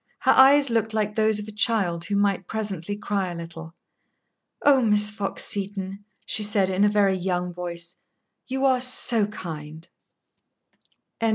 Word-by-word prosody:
Her -, -, +4 dB
eyes 275 Hz, 0 st, +6 dB
looked 225 Hz, -1 st, -1 dB
like 210 Hz, -1 st, -1 dB
those 220 Hz, 0 st, +1 dB
of 210 Hz, 0 st, -5 dB
a -, -, -7 dB
child 205 Hz, -6 st, +1 dB
who 205 Hz, -, -2 dB
might 200 Hz, -2 st, 0 dB
presently 205 Hz, -3 st, -4 dB
cry 200 Hz, -3 st, -2 dB
a 175 Hz, -, -6 dB
little. 165 Hz, 0 st, -9 dB, 0.9 s
"Oh, 280 Hz, -2 st, +5 dB
Miss 210 Hz, -2 st, +3 dB
Fox 205 Hz, -2 st, -3 dB
Seton," 195 Hz, 0 st, -3 dB, 0.2 s
she 220 Hz, -, +1 dB
said, 205 Hz, -2 st, +1 dB
in 190 Hz, +2 st, +1 dB
a 210 Hz, -, +5 dB
very 205 Hz, -2 st, +2 dB
young 180 Hz, -1 st, -2 dB
voice, 170 Hz, -1 st, -6 dB, 0.5 s
"you 265 Hz, +1 st, -1 dB
are 260 Hz, -2 st, +3 dB
so 240 Hz, -4 st, +2 dB
kind!" 160 Hz, -5 st, -8 dB
205 Hz, 155 wpm, -24 LUFS, 180-220 Hz, 0.9 s, eyes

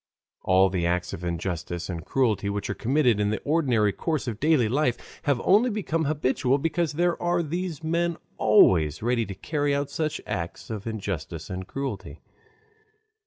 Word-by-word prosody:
All 95 Hz, 0 st, +4 dB
the 90 Hz, -3 st, 0 dB
acts 90 Hz, 0 st, -1 dB
of 85 Hz, -, -6 dB
injustice 85 Hz, 0 st, -3 dB
and 85 Hz, -3 st, -5 dB
cruelty 110 Hz, -6 st, +1 dB
which 100 Hz, 0 st, -2 dB
are -, -, -1 dB
committed 125 Hz, -3 st, +2 dB
in 105 Hz, 0 st, +1 dB
the 110 Hz, -, -1 dB
ordinary 130 Hz, -9 st, +2 dB
course 155 Hz, -6 st, -2 dB
of 110 Hz, -3 st, -4 dB
daily 150 Hz, -6 st, +3 dB
life 125 Hz, +1 st, +1 dB, 0.3 s
have 140 Hz, -4 st, +2 dB
only 215 Hz, +6 st, +4 dB
become 170 Hz, -7 st, -1 dB
habitual 140 Hz, -2 st, +1 dB
because 165 Hz, +2 st, -1 dB
there 175 Hz, +2 st, 0 dB
are 175 Hz, 0 st, +1 dB
these 170 Hz, 0 st, -4 dB
men 170 Hz, +1 st, 0 dB, 0.2 s
always 80 Hz, -2 st, +4 dB
ready 120 Hz, -1 st, +1 dB
to 100 Hz, -, -6 dB
carry 145 Hz, -, -1 dB
out 140 Hz, 0 st, -2 dB
such 155 Hz, -1 st, -2 dB
acts 85 Hz, +4 st, -5 dB
of 110 Hz, 0 st, -5 dB
injustice 95 Hz, -6 st, -5 dB
and 95 Hz, 0 st, -5 dB
cruelty. 135 Hz, 0 st, -5 dB
125 Hz, 165 wpm, -26 LUFS, 95-155 Hz, 0.3 s, All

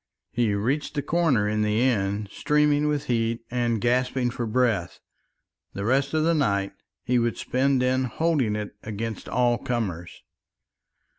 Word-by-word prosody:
He 115 Hz, -4 st, +1 dB
reached 135 Hz, +10 st, -1 dB
the 145 Hz, -, -1 dB
corner 145 Hz, -10 st, +2 dB
in 105 Hz, 0 st, 0 dB
the 105 Hz, +1 st, +1 dB
end, 105 Hz, -5 st, 0 dB
streaming 150 Hz, 0 st, +2 dB
with 150 Hz, -1 st, 0 dB
heat 115 Hz, -2 st, 0 dB
and 120 Hz, -2 st, 0 dB
gasping 125 Hz, +1 st, +1 dB
for 120 Hz, -1 st, -3 dB
breath; 110 Hz, -6 st, 0 dB, 0.7 s
the 100 Hz, -, -4 dB
rest 135 Hz, +5 st, +1 dB
of 155 Hz, -, +2 dB
the 165 Hz, +1 st, +3 dB
night 100 Hz, -10 st, 0 dB, 0.3 s
he 125 Hz, 0 st, +2 dB
would 120 Hz, 0 st, 0 dB
spend 130 Hz, 0 st, +1 dB
in 130 Hz, +1 st, +1 dB
holding 135 Hz, -4 st, 0 dB
it 105 Hz, -1 st, -5 dB
against 110 Hz, +1 st, -5 dB
all 120 Hz, -1 st, +2 dB
comers. 95 Hz, -10 st, -4 dB
120 Hz, 150 wpm, -25 LUFS, 105-135 Hz, 0.7 s, the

